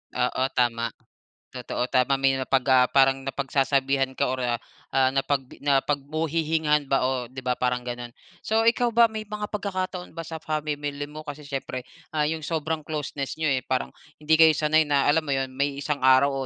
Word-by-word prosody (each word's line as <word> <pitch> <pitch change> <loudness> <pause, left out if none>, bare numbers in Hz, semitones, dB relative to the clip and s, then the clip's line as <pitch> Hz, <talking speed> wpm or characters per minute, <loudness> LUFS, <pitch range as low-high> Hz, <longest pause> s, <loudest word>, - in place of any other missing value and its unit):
Oo 125 +1 +1
tama. 115 -1 +1 0.6
Totoo 125 0 -4
tama 130 +2 +2
may 135 0 +2
napag 130 0 +1
ah, 130 -1 +6
parang 135 0 +3
napagsasabihan 135 -1 0
ka 130 - 0
or 130 - -1
ah 120 -1 -1 0.3
ah, 130 -1 +4
napag 135 0 -1
napag 140 0 +1
mapaghihingian 155 -1 0
ba 135 0 +1
o 130 +1 +1
'di 130 +2 -9
ba 125 -1 -1
parang 125 0 0
ganun. 120 -1 -6 0.3
So 220 +1 +2
ikaw 240 0 0
ba 230 0 +6
may 220 -1 -6
mga 210 0 -5
pagkakataon 185 -3 -4
ba 165 - -5
sa 165 0 -6
Family 155 -1 -3 0.3
mo? 155 +1 -9
Kasi 145 0 -7
siyempre, 135 -3 -5 0.3
ah, 155 - +1
yung 160 -1 -4
sobrang 160 -1 -2
closeness 145 -3 -4
niyo, 155 -1 -1
eh, 130 -2 0
parang 130 -1 -1 0.3
hindi 155 +1 +3
kayo 160 -1 +7
sanay 155 +1 +3
na 145 -1 +2
alam 155 +2 +2
mo 140 - 0
iyon 135 -1 -1
may 140 +2 -1
isang 150 0 -1
araw 135 +1 +4
140 Hz, 185 wpm, -25 LUFS, 130-155 Hz, 0.6 s, kayo